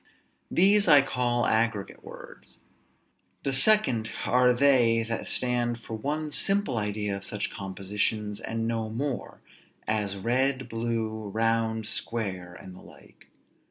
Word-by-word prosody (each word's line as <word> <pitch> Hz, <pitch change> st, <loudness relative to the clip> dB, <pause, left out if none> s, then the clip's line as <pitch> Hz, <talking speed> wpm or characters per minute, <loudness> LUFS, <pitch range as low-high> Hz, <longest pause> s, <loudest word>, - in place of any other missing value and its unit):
These 200 Hz, +3 st, +4 dB
I 145 Hz, -2 st, +8 dB
call 120 Hz, -2 st, 0 dB
aggregate 110 Hz, -3 st, 0 dB
words. -, -, -12 dB, 0.9 s
The 135 Hz, -, -1 dB
second 130 Hz, -, +2 dB, 0.2 s
are 125 Hz, 0 st, +4 dB
they 120 Hz, -3 st, +4 dB
that 115 Hz, 0 st, -4 dB
stand 120 Hz, -1 st, 0 dB
for 115 Hz, -, -9 dB
one 150 Hz, +7 st, -3 dB
simple 195 Hz, -, +1 dB
idea 105 Hz, -1 st, -2 dB
of 100 Hz, -, -10 dB
such 105 Hz, +1 st, -4 dB
compositions, 100 Hz, +2 st, -3 dB
and 115 Hz, 0 st, -3 dB
no 115 Hz, -1 st, -2 dB
more; 130 Hz, +4 st, -4 dB, 0.5 s
as 105 Hz, -2 st, -1 dB
red, 130 Hz, +5 st, 0 dB
blue, 115 Hz, -2 st, -3 dB
round, 110 Hz, +1 st, 0 dB
square, 95 Hz, -7 st, -4 dB
and 95 Hz, -1 st, -11 dB
the -, -, -13 dB
like. -, -, -17 dB
115 Hz, 125 wpm, -27 LUFS, 105-125 Hz, 0.9 s, I